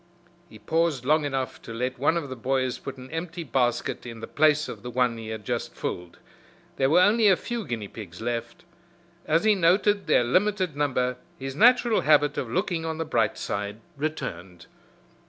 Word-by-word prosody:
He 110 Hz, -, -13 dB
paused 155 Hz, +3 st, 0 dB
long 155 Hz, +2 st, +3 dB
enough 135 Hz, -2 st, -3 dB
to -, -, -9 dB
let 125 Hz, +2 st, -3 dB
one 155 Hz, +5 st, +2 dB
of 155 Hz, -4 st, -3 dB
the 130 Hz, -, -6 dB
boys 130 Hz, +1 st, -1 dB
put 135 Hz, 0 st, -7 dB
an 130 Hz, +2 st, -11 dB
empty 165 Hz, +1 st, -4 dB
basket 125 Hz, -3 st, 0 dB
in 115 Hz, -2 st, -8 dB
the 115 Hz, -, -6 dB
place 155 Hz, 0 st, +2 dB
of 105 Hz, -, -8 dB
the 125 Hz, -, -6 dB
one 125 Hz, -1 st, +1 dB
he 110 Hz, -, -8 dB
had 110 Hz, -2 st, -6 dB
just -, -, -3 dB
filled. 90 Hz, -1 st, -5 dB, 0.6 s
There 135 Hz, -, +2 dB
were 170 Hz, +4 st, +5 dB
only 210 Hz, +3 st, +5 dB
a 195 Hz, -, +6 dB
few 240 Hz, -2 st, -4 dB
guinea 110 Hz, -4 st, -4 dB
pigs 95 Hz, -5 st, -10 dB
left. 115 Hz, +4 st, -4 dB, 0.6 s
As 165 Hz, +4 st, +3 dB
he 215 Hz, -1 st, +5 dB
noted 195 Hz, +3 st, +2 dB
their -, -, +4 dB
limited 185 Hz, -, +1 dB
number 125 Hz, -3 st, 0 dB, 0.2 s
his 135 Hz, 0 st, -6 dB
natural 240 Hz, -, +5 dB
habit 145 Hz, 0 st, +4 dB
of -, -, -4 dB
looking 175 Hz, -3 st, -1 dB
on 160 Hz, -1 st, -3 dB
the 165 Hz, -, -2 dB
bright 115 Hz, -8 st, +1 dB
side 100 Hz, +1 st, -4 dB, 0.2 s
returned. 95 Hz, -, -5 dB
135 Hz, 190 wpm, -26 LUFS, 120-165 Hz, 0.6 s, a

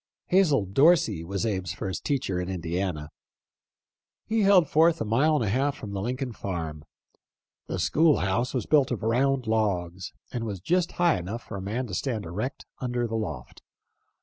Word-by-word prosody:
Hazel 160 Hz, -, +4 dB
Dorsey 135 Hz, -, +3 dB
was 100 Hz, +5 st, -3 dB
Abe's 95 Hz, -6 st, -2 dB
first 95 Hz, -1 st, -4 dB
teacher 95 Hz, -10 st, -1 dB
in 90 Hz, -, -4 dB
Indiana. 85 Hz, -3 st, -3 dB, 1.1 s
He 225 Hz, 0 st, +1 dB
held 195 Hz, -5 st, +5 dB
forth 165 Hz, +3 st, +4 dB
a -, -, -2 dB
mile 135 Hz, +9 st, +3 dB
and 125 Hz, -, +1 dB
a -, -, 0 dB
half 135 Hz, +5 st, +1 dB
from 105 Hz, -, -7 dB
the 100 Hz, -1 st, -3 dB
Lincoln 125 Hz, +3 st, -3 dB
farm. 80 Hz, -7 st, -5 dB, 0.8 s
The -, -, -3 dB
school 160 Hz, -1 st, +3 dB
house 100 Hz, +6 st, 0 dB
was 125 Hz, -5 st, -2 dB
built 145 Hz, -3 st, +3 dB
of 120 Hz, -5 st, -3 dB
round 130 Hz, +3 st, +1 dB
logs, 95 Hz, -5 st, -1 dB, 0.2 s
and 120 Hz, -3 st, -3 dB
was 105 Hz, -4 st, -4 dB
just 175 Hz, -, 0 dB
high 175 Hz, -, +2 dB
enough 100 Hz, +7 st, -5 dB
for 110 Hz, -, -8 dB
a 95 Hz, -, -5 dB
man 110 Hz, +7 st, -2 dB
to 105 Hz, -, -8 dB
stand 110 Hz, +1 st, -2 dB
erect 105 Hz, -, -4 dB
under 120 Hz, -2 st, -1 dB
the 115 Hz, -, -5 dB
loft. 110 Hz, -2 st, -5 dB
115 Hz, 175 wpm, -27 LUFS, 95-140 Hz, 1.1 s, held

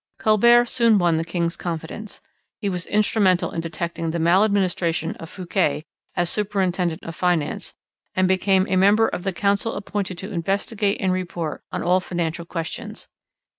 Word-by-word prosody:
Colbert 235 Hz, +3 st, +5 dB
soon 230 Hz, -3 st, +3 dB
won 175 Hz, -3 st, +3 dB
the 160 Hz, -, 0 dB
king's 170 Hz, 0 st, -1 dB
confidence. 175 Hz, +5 st, -6 dB, 0.4 s
He 205 Hz, -, -2 dB
was 180 Hz, -2 st, -3 dB
instrumental 205 Hz, -3 st, +2 dB
in 165 Hz, -, -3 dB
detecting 165 Hz, 0 st, -4 dB
the 165 Hz, -, -2 dB
maladministration 175 Hz, -2 st, +2 dB
of 165 Hz, -, -9 dB
Fouquet 175 Hz, -5 st, -1 dB, 0.3 s
as 175 Hz, -, +1 dB
superintendent 185 Hz, -4 st, -1 dB
of 165 Hz, -, -7 dB
Finance, 175 Hz, -4 st, -1 dB, 0.4 s
and 185 Hz, 0 st, +3 dB
became 190 Hz, 0 st, +3 dB
a 185 Hz, -, +1 dB
member 205 Hz, +4 st, +5 dB
of -, -, -4 dB
the 195 Hz, +1 st, -1 dB
council 200 Hz, +4 st, 0 dB
appointed 200 Hz, -2 st, -3 dB
to 195 Hz, +4 st, -6 dB
investigate 200 Hz, +4 st, 0 dB
and 185 Hz, -2 st, +1 dB
report 175 Hz, -4 st, -3 dB
on -, -, -3 dB
all 180 Hz, +2 st, +3 dB
financial 170 Hz, -2 st, -3 dB
questions. 165 Hz, -2 st, -6 dB
185 Hz, 155 wpm, -23 LUFS, 170-200 Hz, 0.4 s, Colbert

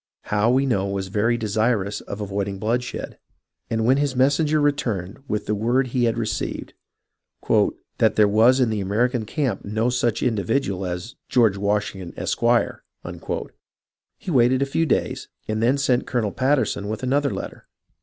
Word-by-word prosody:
Howe 105 Hz, +2 st, +1 dB
we 130 Hz, +2 st, +3 dB
know 100 Hz, -7 st, +1 dB
was 100 Hz, -1 st, -3 dB
very 110 Hz, +4 st, +1 dB
desirous 110 Hz, -2 st, 0 dB
of 100 Hz, -, -7 dB
avoiding 100 Hz, -1 st, -3 dB
bloodshed, 120 Hz, +5 st, -3 dB, 0.5 s
and 110 Hz, -1 st, 0 dB
when 130 Hz, +3 st, +4 dB
his 140 Hz, -2 st, 0 dB
messenger 145 Hz, +4 st, +3 dB
returned 120 Hz, -8 st, -1 dB
with 105 Hz, -1 st, -2 dB
the 105 Hz, -, -1 dB
word 120 Hz, +5 st, +1 dB
he 125 Hz, -1 st, +1 dB
had 115 Hz, 0 st, 0 dB
received, 110 Hz, -2 st, -3 dB, 0.7 s
" -, -, -20 dB, 0.5 s
that -, -, +3 dB
there 105 Hz, -1 st, +5 dB
was 115 Hz, +6 st, +5 dB
in 125 Hz, -3 st, +2 dB
the 105 Hz, -2 st, -1 dB
American 115 Hz, +4 st, 0 dB
camp 135 Hz, +2 st, -2 dB
no 110 Hz, +4 st, 0 dB
such 120 Hz, -2 st, 0 dB
indi\"idual 100 Hz, -3 st, 0 dB
as 90 Hz, +7 st, -5 dB, 0.2 s
George 115 Hz, -6 st, +4 dB
Washington, 100 Hz, -3 st, -2 dB
Esq.," -, -, -2 dB, 1.8 s
he 180 Hz, -, -6 dB
waited 130 Hz, 0 st, +4 dB
a 140 Hz, -, -6 dB
few 165 Hz, -, +2 dB
days, -, -, -1 dB, 0.2 s
and 110 Hz, 0 st, -1 dB
then 125 Hz, +5 st, +3 dB
sent 130 Hz, -3 st, +1 dB
Colonel 110 Hz, -5 st, 0 dB
Patter 135 Hz, +3 st, +2 dB
son 100 Hz, -, -4 dB
with 110 Hz, +3 st, -4 dB
another 140 Hz, +2 st, +1 dB
letter. -, -, -7 dB
115 Hz, 165 wpm, -23 LUFS, 105-130 Hz, 1.8 s, there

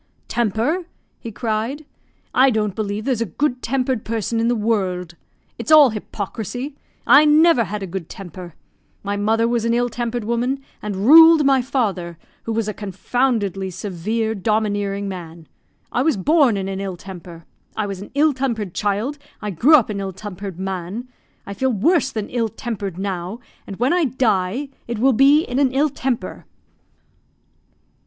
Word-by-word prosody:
"Temper!" 240 Hz, -, 0 dB, 0.3 s
he 230 Hz, -, -7 dB
cried, 225 Hz, +7 st, -3 dB, 0.5 s
"I 265 Hz, +1 st, +5 dB
don't 215 Hz, -4 st, 0 dB
believe 210 Hz, 0 st, -3 dB
there's 255 Hz, -4 st, 0 dB
a -, -, +1 dB
good 250 Hz, -, -1 dB
tempered 255 Hz, -2 st, -1 dB
person 225 Hz, 0 st, -2 dB
in 230 Hz, -, +1 dB
the 240 Hz, -, +2 dB
world. 190 Hz, -6 st, -1 dB, 0.5 s
It's -, -, -3 dB
all 300 Hz, -5 st, +8 dB
hypocrisy! 225 Hz, +6 st, -5 dB, 0.3 s
I 280 Hz, +5 st, +7 dB
never 305 Hz, -4 st, +5 dB
had 205 Hz, +1 st, -5 dB
a -, -, -2 dB
good 185 Hz, -2 st, -6 dB
temper! 180 Hz, -2 st, -9 dB, 0.5 s
My 200 Hz, 0 st, -2 dB
mother 220 Hz, +3 st, +1 dB
was 235 Hz, -1 st, 0 dB
an 230 Hz, 0 st, +1 dB
ill 245 Hz, 0 st, +1 dB
tempered 240 Hz, 0 st, -3 dB
woman, 245 Hz, +5 st, -1 dB, 0.2 s
and 200 Hz, -1 st, -3 dB
ruled 320 Hz, +2 st, +8 dB
my 270 Hz, -1 st, +4 dB
father, 200 Hz, -10 st, -2 dB, 0.3 s
who 230 Hz, -, -3 dB
was 225 Hz, -1 st, -1 dB
a 215 Hz, -, -2 dB
confoundedly 200 Hz, -1 st, -1 dB
severe, 210 Hz, +4 st, -2 dB
domineering 205 Hz, -1 st, -1 dB
man. 170 Hz, -4 st, -8 dB, 0.4 s
I 245 Hz, -, +1 dB
was 295 Hz, -4 st, +2 dB
born 280 Hz, -, +3 dB
in 190 Hz, -1 st, -3 dB
an 195 Hz, 0 st, -4 dB
ill 190 Hz, -2 st, -4 dB
temper. 175 Hz, -3 st, -11 dB, 0.3 s
I 215 Hz, -, 0 dB
was 195 Hz, -2 st, -5 dB
an 200 Hz, -, -9 dB
ill 300 Hz, +1 st, +4 dB
tempered 230 Hz, -8 st, -2 dB
child; 215 Hz, +8 st, -1 dB, 0.2 s
I 210 Hz, -2 st, -4 dB
grew 255 Hz, -, +5 dB
up 245 Hz, -7 st, +3 dB
an 200 Hz, -, -3 dB
ill 195 Hz, -1 st, -4 dB
tempered 195 Hz, -1 st, -7 dB
man. 190 Hz, +5 st, -5 dB, 0.4 s
I 200 Hz, -, -6 dB
feel 265 Hz, +6 st, 0 dB
worse 270 Hz, -, +2 dB
than 215 Hz, -2 st, -4 dB
ill 230 Hz, -2 st, 0 dB
tempered 210 Hz, -6 st, -5 dB
now, 190 Hz, +2 st, -4 dB, 0.3 s
and 195 Hz, -, -6 dB
when 250 Hz, -, +1 dB
I 355 Hz, -2 st, +2 dB
die 240 Hz, 0 st, 0 dB, 0.2 s
it 235 Hz, -1 st, -3 dB
will 260 Hz, +4 st, +3 dB
be 280 Hz, +6 st, +5 dB
in 250 Hz, -2 st, -2 dB
an 275 Hz, -3 st, +3 dB
ill 285 Hz, +3 st, +2 dB
temper." 260 Hz, -3 st, -4 dB
220 Hz, 170 wpm, -21 LUFS, 195-255 Hz, 0.5 s, all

